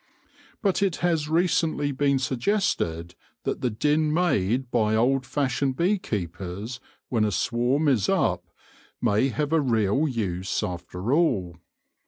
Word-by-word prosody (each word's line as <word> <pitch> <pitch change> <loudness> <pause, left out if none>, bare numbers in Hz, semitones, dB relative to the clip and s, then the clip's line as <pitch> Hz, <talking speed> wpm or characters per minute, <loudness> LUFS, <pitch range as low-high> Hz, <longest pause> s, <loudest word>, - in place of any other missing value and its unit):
But 195 -2 +1
it 195 -4 +2
has 160 -3 +1
recently 160 -3 +1
been 140 0 +1
suggested 125 - -1 0.3
that - - -3
the 125 - +1
din 150 +7 +1
made 130 - +1
by 110 -2 +2
old 130 +3 +2
fashioned 135 -1 0
bee 190 +4 +2
keepers 100 - -5 0.3
when 115 -4 +1
a 105 - +1
swarm 125 +8 +1
is 125 -9 +2
up - - +1 0.6
may 105 +6 +2
have 150 +3 -2
a 160 - +4
real 120 +2 +1
use 95 -7 -2
after 90 +4 -3
all. 95 - +1
130 Hz, 135 wpm, -25 LUFS, 105-150 Hz, 0.6 s, a